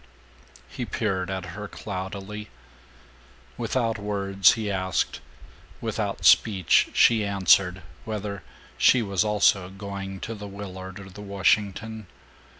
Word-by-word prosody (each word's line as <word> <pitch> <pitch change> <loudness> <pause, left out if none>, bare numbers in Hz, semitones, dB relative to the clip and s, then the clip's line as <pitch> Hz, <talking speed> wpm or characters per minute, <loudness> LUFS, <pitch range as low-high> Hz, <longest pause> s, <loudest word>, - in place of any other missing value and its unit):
He 125 - -6
peered 95 -6 -2
at 95 -1 -3
her 105 +2 -6
cloudily. 100 +2 -6 1.1
Without 115 -4 -1
words 100 -1 +3
he 110 -2 -3
asked, 95 -1 -1 0.6
without - - -3
speech 95 -6 +5
she 115 -2 +5
answered, 95 -2 +3 0.2
whether 105 -2 -4 0.4
she 125 - +5
was 100 -2 +1
also 100 -3 +2
going 95 0 -7
to 115 - -4
the 105 -2 -8
Willard 95 -1 -8
or 95 -1 -11
the 105 +3 -10
Washington. 105 +2 0
100 Hz, 115 wpm, -25 LUFS, 95-105 Hz, 1.1 s, speech